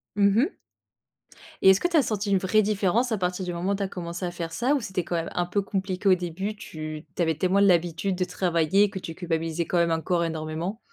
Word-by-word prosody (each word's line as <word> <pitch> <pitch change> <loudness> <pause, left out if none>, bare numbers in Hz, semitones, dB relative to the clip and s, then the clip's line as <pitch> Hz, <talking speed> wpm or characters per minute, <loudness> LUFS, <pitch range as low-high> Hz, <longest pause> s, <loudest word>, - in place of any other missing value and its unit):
Mmh 200 0 +4
mh. 315 +10 +1 1.1
Et 190 - +7
est-ce 190 - +6
que - - +1
tu 345 -2 +2
as - - +7
senti 205 -2 -2
une 195 - +5
vraie 190 +3 +3
différence 215 +4 +1
à 220 - +1
partir 180 0 -2
du 175 - -3
moment 180 +3 -1
où - - 0
tu 200 - -2
as - - -1
commencé 175 -1 -5
à 175 - -3
faire 170 -1 -5
ça? 250 - +1
Ou 275 - -1
c'était 190 -4 -3
quand 175 - -3
même 165 0 -2
un 175 - +1
peu 190 +3 0
compliqué 195 -1 -1
au 185 - +7
début, 180 +4 -4
tu 155 -5 -7
tu - - -2
avais 160 -2 +2
tellement 185 +4 +2
l'habitude 175 -1 +2
de 180 - 0
travailler 180 +2 +2
que 190 - -6
tu 165 - -7
culpabilisais 165 -1 -2
quand 175 - -1
même 170 -1 +3
encore 170 +2 0
énormément? 165 +5 -3
180 Hz, 245 wpm, -26 LUFS, 170-200 Hz, 1.1 s, Et